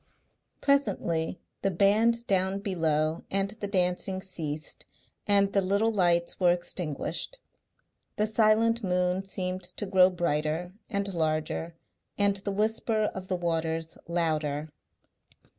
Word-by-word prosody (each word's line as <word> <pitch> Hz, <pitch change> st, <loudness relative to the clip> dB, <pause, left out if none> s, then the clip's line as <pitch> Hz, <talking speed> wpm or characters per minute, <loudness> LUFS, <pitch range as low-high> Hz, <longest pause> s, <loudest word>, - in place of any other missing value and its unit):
Presently 190 Hz, -, +1 dB, 0.2 s
the 195 Hz, -, +1 dB
band 215 Hz, +5 st, +3 dB
down 190 Hz, -1 st, +1 dB
below 160 Hz, -5 st, 0 dB
and 195 Hz, +1 st, 0 dB
the 215 Hz, -1 st, -5 dB
dancing 185 Hz, 0 st, 0 dB
ceased 160 Hz, -5 st, -4 dB, 0.4 s
and 200 Hz, -1 st, +4 dB
the 195 Hz, -, +4 dB
little 200 Hz, +4 st, +2 dB
lights 175 Hz, -4 st, +2 dB
were 180 Hz, -2 st, +5 dB
extinguished. 175 Hz, -, -3 dB, 0.8 s
The 210 Hz, -, +1 dB
silent 220 Hz, +1 st, +3 dB
moon 180 Hz, 0 st, 0 dB
seemed 185 Hz, -1 st, -3 dB
to 180 Hz, +3 st, -5 dB
grow 190 Hz, -1 st, +5 dB
brighter 170 Hz, 0 st, -1 dB, 0.2 s
and 200 Hz, -3 st, -2 dB
larger 160 Hz, 0 st, -1 dB, 0.4 s
and 200 Hz, -1 st, +3 dB
the 200 Hz, +1 st, -4 dB
whisper 215 Hz, +1 st, 0 dB
of 190 Hz, -1 st, -7 dB
the 185 Hz, -, -1 dB
waters 165 Hz, -1 st, -2 dB
louder. 155 Hz, -3 st, -1 dB
185 Hz, 120 wpm, -28 LUFS, 170-200 Hz, 0.8 s, were